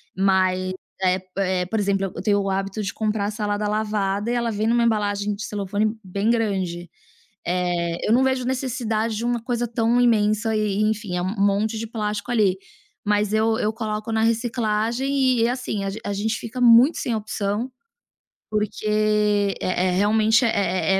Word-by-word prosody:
Mas 185 -1 +2 0.3
é 185 0 +2 0.2
é, 185 -2 0
por 220 +5 -2
exemplo, 195 -1 +1
eu - - -5
tenho 205 +1 +2
o 195 0 -1
hábito 195 +2 -2
de 200 - -3
comprar 215 -2 -1
a 205 - -2
salada 210 0 -2
lavada 210 -1 -1
e 240 - 0
ela 235 -1 0
vem 215 +1 -1
em - - +3
uma 240 0 +3
embalagem 205 -2 0
de 205 +1 -6
celofane 210 +2 -2
bem 200 +3 -1
grande, 190 -7 -1 0.6
eh, 175 -1 -1
eu - - +2
não 250 +3 +4
vejo 260 -1 +1
necessidade 240 -4 -1
de 220 - -3
uma 240 -1 0
coisa 240 0 -2
tão 235 +1 +1
imensa 220 -1 +2
e, 210 -2 0
enfim, 215 -3 -1
é 175 - -1
um 185 +4 -2
monte 205 +3 +1
de 225 +1 -4
plástico 210 0 -3
ali. 205 -6 +2 0.5
Mas 210 0 +1
eu 220 +1 +2
eu 215 - +1
coloco 215 0 -4
na 220 0 +1
reciclagem 235 +3 +1
e, 230 - +3
assim, 245 -5 -3
a - - -1
gen 210 +3 -7
a 205 - -3
gente 215 +3 -1
fica 230 +2 -7
muito 245 +5 +6
sem 235 - -1
opção, 215 +2 -2 0.8
porque, 210 0 -2
eh 210 -1 +2 0.3
eh, - - +1
realmente, 220 +3 +3
é 195 -3 +1
215 Hz, 180 wpm, -23 LUFS, 200-230 Hz, 0.8 s, muito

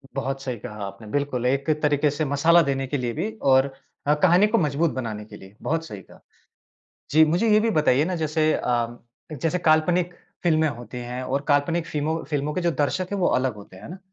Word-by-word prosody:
बहुत 135 0 -3
सही 130 -3 -4
कहा 105 -1 -7
आपने, 100 +3 -9
बिल्कुल। 140 -4 -1
एक 135 +4 0
तरीके 150 0 +2
से 150 +2 -2
मसाला 160 +5 +4
देने 135 -2 -1
के 145 - -2
लिए 120 -2 -2
भी 190 - -3 0.2
और 135 +1 +3 0.3
अ, 150 - +5
कहानी 175 +6 +4
को 225 +2 +1
मज़बूत 155 -1 +1
बनाने 110 -5 -4
के - - -12
लिए 95 +1 -15
बहुत 165 +1 -1
सही 105 -9 -8
कहा। - - -18 0.9
जी, 160 +2 +6
मुझे 175 +9 +1
ये 210 - +6
भी 225 +1 +1
बताइए 150 -1 +3
ना, 185 +1 -2
जैसे 155 -1 +1
अ, 120 -1 -1 0.3
जैसे 160 +4 -1
काल्पनिक 170 +2 +2 0.3
फ़िल्में 160 -2 +3
होती 120 -1 -8
हैं 125 +1 -5
और 140 +2 -1
काल्पनिक 160 +3 +1
फिमो 150 +1 -1
फ़िल्मों 150 0 -1
के 180 - -2
जो 170 - +1
दर्शक 160 +5 -1
हैं 200 - -1
वो 180 - +2
अलग 130 -3 -1
होते 100 -2 -13
हैं, 95 - -14
है - - -9
ना? 180 - -8
145 Hz, 215 wpm, -24 LUFS, 130-165 Hz, 0.9 s, जी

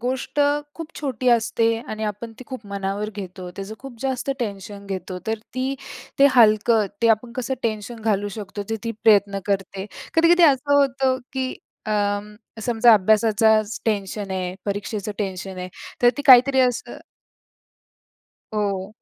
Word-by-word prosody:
गोष्ट 260 +4 -2 0.3
खूप 330 0 -9
छोटी 255 -4 -1
असते 230 0 +2
आणि 215 0 -4
आपण 215 +2 -5
ती 255 - -10
खूप 255 -6 -8
मनावर 200 +1 -3
घेतो. 185 -2 -7
त्याचं 200 +2 -6
खूप 265 -3 -10
जास्त 265 0 -2
टेन्शन 200 -2 -5
घेतो. 190 -1 -5
तर 220 0 -1 0.2
ती 260 +1 -1 0.4
ते 280 - +8
हलकं, 215 -1 +5 0.2
ते 230 - +5
आपण 235 +2 -14
कसं 255 +1 -2
टेन्शन 220 +1 -3
घालू 205 -2 0
शकतो, 205 -1 -6
ते 225 - 0
ती 230 - -2
प्रयत्न 200 -2 +4
करते. 195 0 -2 0.3
कधी-कधी 340 +1 +5
असं 285 +2 0
होतं, 270 -2 +2
की 260 -1 -2 0.3
अं, 205 -1 0 0.4
समजा 235 0 +5
अभ्यासाचाच 215 +1 +3
टेन्शन 205 -2 -2
आहे, 185 -1 -3
परीक्षेचं 205 +1 -3
टेन्शन 190 -1 -4
आहे. 180 0 -5 0.3
तर 240 - +7
ती 285 - -3
काहीतरी 265 +1 +7
असं 245 -2 -1 1.6
हो. 200 -1 -2
220 Hz, 145 wpm, -22 LUFS, 200-250 Hz, 1.6 s, ते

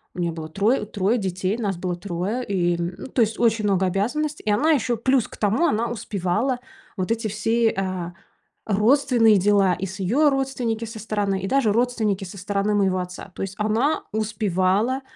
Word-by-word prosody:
у - - -7
нее 170 -1 0
было 160 -1 -6
трое 210 +6 +1
трое 205 +3 0
детей, 190 +1 -2
нас 200 -5 -1
было 180 0 -2
3, 195 +6 -3
и, 175 -3 +1
м, 175 +1 -3
ну, - - -7
то 250 - 0
есть 220 0 +1
очень 225 -2 +2
много 190 -2 +2
обязанностей, 280 +11 -1
и - - 0
она 300 +10 +3
еще 245 -4 +1
плюс 260 0 +2
к - - -12
тому, 220 +11 +2
она 230 -3 0
успевала 215 +4 -1 0.4
вот 185 +4 -2
эти 225 -1 0
все, 225 +2 +1
а, 185 -2 -3 0.5
родственные 225 +1 +4
дела, 195 -1 +3
и 180 +3 -3
с 190 +1 -8
её 265 +11 +3
родственники 255 -4 -1
со 225 0 -8
стороны, 205 -3 -1
и 195 - -3
даже 250 -5 +2
родственники 220 -5 0
со 190 +3 -9
стороны 200 +2 -1
моего 190 -2 +2
отца. 180 +1 -7
То - - -7
есть 195 0 -5
она 220 +8 +1
успевала 210 +3 0
210 Hz, 190 wpm, -23 LUFS, 190-235 Hz, 0.5 s, родственные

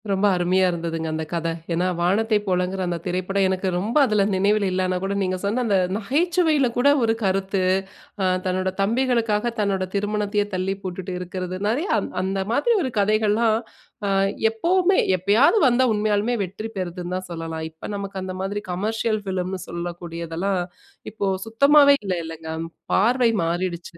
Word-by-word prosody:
ரொம்ப 195 +1 +1
அருமையா 185 +1 +2
இருந்ததுங்க, 165 -1 -3
அந்த 160 0 -2
கத! 170 -1 -1 0.3
ஏன்னா 175 +2 +1
'வானத்தை 210 +6 +2
போலங்கிற' 185 0 0
அந்த 175 -1 -1
திரைப்படம் 185 +2 0
எனக்கு 190 0 -1
ரொம்ப 215 +9 -1
அதில 215 -4 +2
நினைவில 200 +2 +2
இல்லன்னா 185 0 0
கூட, 195 +1 -1
நீங்க 185 0 -1
சொன்ன 210 +5 0
அந்த 205 -4 +2 0.2
நகைச்சுவையில 310 - +2
கூட 260 +3 +4
ஒரு 225 0 +3
கருத்து! 195 0 0 0.6
அ - - +1 0.2
தன்னோட 185 0 0
தம்பிகளுக்காக 230 0 +1
தன்னோட 200 -2 0
திருமணத்தையே 205 0 0
தள்ளி 185 +1 -1
போட்டுட்டு 185 0 -5
இருக்கிறது! 180 0 -5
நிறைய 275 - 0
அந் - - -5
அந்த 195 +1 -1
மாதிரி 380 - +2
ஒரு 260 -5 -2
கதைகள்லாம், 215 +2 +2 0.5
அ - - 0 0.4
எப்பவுமே, 360 - +2 0.2
எப்பயாது 205 - +4
வந்தா 255 +1 +3
உண்மையாலுமே 210 +2 +1
வெற்றி 200 +5 -7
பெறுதுன்னு 180 -1 -4
தான் 185 - -7
சொல்லலாம், 165 -1 -5
இப்ப 160 - -9
நமக்கு 200 -1 -5
அந்த 185 0 -5
மாதிரி 200 +2 -3
கமர்ஷியல் 215 +3 -1
ஃபிலிம்ன்னு 185 -1 -3
சொல்லக்கூடியதெல்லாம், 170 +1 -3 0.5
இப்போ 205 -1 -2 0.2
சுத்தமாவே 280 +5 +6
இல்ல, 190 - 0
இல்லங்க. 160 0 -8 0.4
பார்வை 235 +3 +3
மாறிடுச்சு! 170 0 -3
195 Hz, 150 wpm, -23 LUFS, 180-220 Hz, 0.6 s, சுத்தமாவே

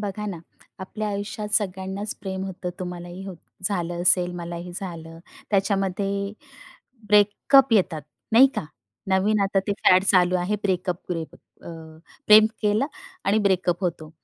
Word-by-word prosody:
बघा 210 0 -4
ना, 185 -5 -5 0.4
आपल्या 210 +3 -4
आयुष्यात 205 +1 -4
सगळ्यांनाच 195 0 -2
प्रेम 190 -1 -4
होतं, 185 -1 -5
तुम्हालाही 180 0 -7
होत 185 -3 -7 0.3
झालं 175 -3 -3
असेल, 180 0 +3
मलाही 175 +1 -6
झालं. 165 -3 -8 0.3
त्याच्यामध्ये 200 0 0 0.8
ब्रेकअप 210 +6 +4
येतात, 180 -7 +2 0.3
नाही 245 +4 +8
का? - - -3 0.4
नवीन 200 +3 +2
आता 195 0 +1
ते 205 - +1
फॅड 185 0 +6
चालू 185 -2 +3
आहे 180 +4 -1
ब्रेकअप-ग्रेकप 180 -3 -3 0.3
अ, - - -9 0.6
प्रेम 215 0 +8 0.2
केलं 210 +5 +2 0.4
आणि 205 +2 +2
ब्रेकअप 185 -4 +1
होतो. 160 -3 -3
190 Hz, 130 wpm, -24 LUFS, 180-205 Hz, 0.8 s, नाही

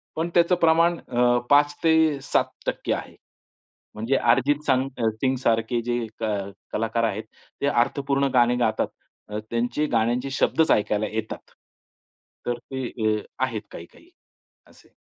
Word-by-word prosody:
पण 165 +2 -1
त्याचं 175 +1 +4
प्रमाण 165 +1 +4
अ, 120 0 +2
5-7% 145 0 +2
आहे. - - -6 0.8
म्हणजे 115 +5 0
अर्जित 135 +5 +2
संग 130 -1 +2 0.3
सिंग 130 0 +2
सारखे 115 0 0
जे 120 0 -2 0.2
क - - -3 0.5
कलाकार 115 +1 0
आहेत, 110 -1 -1 0.4
ते 140 - +1
अर्थपूर्ण 140 +2 +1
गाणे 120 -1 +4
गातात. 125 - +1 0.4
अ, 105 0 -3
त्यांचे 120 +6 0
गाण्यांचे 120 +4 +1
शब्दच 160 +4 +2
ऐकायला 105 0 +1
येतात. 110 +1 -6 0.9
तर 120 0 -1
ते 130 +1 -6 0.3
अ, - - -8 0.2
आहेत 115 -5 -4
काही-काही 85 - -12 0.6
असे. - - -22
125 Hz, 125 wpm, -24 LUFS, 115-145 Hz, 0.9 s, त्याचं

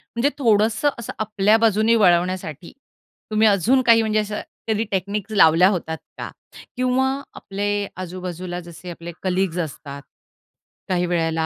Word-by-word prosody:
म्हणजे 240 +5 +2
थोडंसं 225 +2 +3
असं 230 - -6
आपल्या 215 0 +2
बाजूने 225 0 +3
वळवण्यासाठी 180 -5 +1 0.6
तुम्ही 215 +1 +4
अजून 215 +7 +3
काही 230 -1 +6
म्हणजे 215 -1 +1
असं 210 0 -3 0.3
कधी 220 0 +1
टेक्निक 200 +2 -2
लावल्या 175 -3 +6
होतात 160 -4 -3 0.2
का? - - -5 0.5
किंवा 255 +1 +1 0.3
आपले 205 +1 -2
आजूबाजूला 180 -1 -6
जसे 175 +1 -11
आपले 170 0 -8
कलीग्स 185 -1 0
असतात. 140 -3 -6 0.9
काही 180 -1 +1
वेळेला 165 -2 0
195 Hz, 130 wpm, -22 LUFS, 175-220 Hz, 0.9 s, काही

